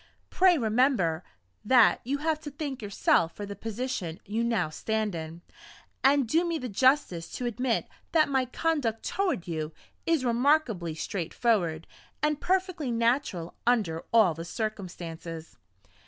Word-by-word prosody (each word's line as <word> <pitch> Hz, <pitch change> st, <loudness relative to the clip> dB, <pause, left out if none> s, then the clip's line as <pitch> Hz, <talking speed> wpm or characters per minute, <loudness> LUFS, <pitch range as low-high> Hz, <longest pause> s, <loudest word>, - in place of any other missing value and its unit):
Pray 370 Hz, -2 st, +5 dB
remember 220 Hz, -, +2 dB, 0.4 s
that 245 Hz, 0 st, +5 dB
you 275 Hz, +4 st, -1 dB
have 310 Hz, +1 st, 0 dB
to 310 Hz, -, -7 dB
thank 285 Hz, -3 st, -5 dB
yourself 195 Hz, -5 st, +1 dB
for 205 Hz, -, -5 dB
the 200 Hz, 0 st, -7 dB
position 220 Hz, -7 st, -4 dB
you 220 Hz, +3 st, -1 dB
now 225 Hz, -8 st, +1 dB
stand 215 Hz, +6 st, -2 dB
in; 165 Hz, +1 st, -7 dB, 0.6 s
and 275 Hz, -2 st, +4 dB
do 325 Hz, +9 st, +3 dB
me 340 Hz, -2 st, -1 dB
the 255 Hz, -, -4 dB
justice 245 Hz, -, +2 dB
to 250 Hz, -, -5 dB
admit 240 Hz, 0 st, 0 dB, 0.2 s
that 315 Hz, -2 st, +4 dB
my 265 Hz, -2 st, +1 dB
conduct 255 Hz, -4 st, -1 dB
toward 355 Hz, -, -1 dB
you 155 Hz, -2 st, -3 dB, 0.4 s
is 325 Hz, -6 st, +2 dB
remarkably 235 Hz, -, +2 dB
straightforward, 175 Hz, -1 st, -1 dB, 0.4 s
and 300 Hz, -1 st, +1 dB
perfectly 370 Hz, -6 st, 0 dB
natural 230 Hz, -, 0 dB
under 200 Hz, -10 st, +1 dB
all 220 Hz, -7 st, +5 dB
the 165 Hz, +1 st, -7 dB
circumstances." 170 Hz, -5 st, -6 dB
230 Hz, 140 wpm, -28 LUFS, 175-280 Hz, 0.6 s, Pray